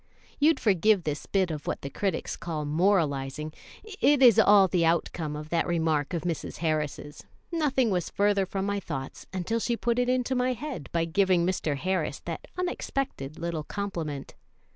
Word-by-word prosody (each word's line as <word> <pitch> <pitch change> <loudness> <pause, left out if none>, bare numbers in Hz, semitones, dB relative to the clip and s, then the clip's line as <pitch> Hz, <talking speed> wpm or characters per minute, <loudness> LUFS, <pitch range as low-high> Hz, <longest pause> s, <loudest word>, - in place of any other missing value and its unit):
You'd 310 +2 +4
forgive 205 -1 +3
this 150 -2 -3
bit 190 -3 +1
of 150 -2 -6
what - - -3
the 140 - -4
critics 195 +1 -2
call 155 -3 -4
moralizing 150 -3 +1 0.3
it 340 -10 +2
is 240 -5 +8
all 200 -2 +7
the 180 -2 +1
outcome 165 -2 0
of 150 +1 -7
that 170 +1 +1
remark 160 -2 0
of 165 - -3
Mrs. 170 -3 -3
Harris's; 150 -2 -2 0.3
nothing 270 -8 +1
was 180 -3 -1
further 200 -1 +2
from 195 +1 -2
my 200 0 -1
thoughts 135 -8 -6
until 195 +5 -1
she 235 +1 -1
put 240 +1 0
it 245 0 +1
into 255 0 +1
my 255 0 +1
head 260 - -6
by 165 -1 +1
giving 180 0 +2
Mr. 165 -5 -1
Harris 180 -3 -1
that 165 -2 -6
unexpected 275 - -3
little 170 -2 -3
compliment. 165 -7 -4
180 Hz, 170 wpm, -27 LUFS, 155-215 Hz, 0.3 s, is